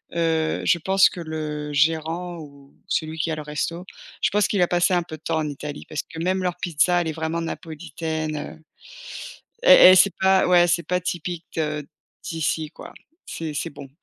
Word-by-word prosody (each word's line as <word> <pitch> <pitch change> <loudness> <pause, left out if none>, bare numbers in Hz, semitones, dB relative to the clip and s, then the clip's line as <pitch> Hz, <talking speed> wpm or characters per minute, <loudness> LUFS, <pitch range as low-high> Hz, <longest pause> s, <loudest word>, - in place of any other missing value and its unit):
heu, 160 -1 0
je 175 - +3
pense 190 +3 +4
que - - -9
le 150 -2 -5
gérant 165 +3 0
ou 140 -3 -13
celui 160 0 -2
qui 160 0 -1
a - - -1
le 155 - -6
resto, 150 +4 -4 0.4
je - - +3
pense 205 0 +2
qu'il 200 - 0
a 175 - +4
passé 175 +1 +2
un 175 - +3
peu 155 -2 -9
de 155 - -32
temps 160 -1 0
en 150 - -2
Italie 145 +1 -7
parce 150 - -3
que 160 - -11
même 185 +1 0
leur 180 -1 -1
pizza, 175 0 +2
elle 165 - -3
est - - -1
vraiment 160 +1 -3
napolitaine, 160 -1 -5
heu 155 +2 -8 1.0
et - - +9
et 185 - +7
c'est 185 -1 +5
pas 190 0 +4
ouais, 175 -1 +5
c'est 170 0 +1
pas 180 +1 -1
typique 175 -1 -4
de 150 -2 -2 0.4
d'ici, 160 -1 -2
quoi, - - -12 0.3
c'est 160 -2 -5
c'est - - -3
bon, 140 -2 -11
160 Hz, 200 wpm, -23 LUFS, 155-175 Hz, 1.0 s, et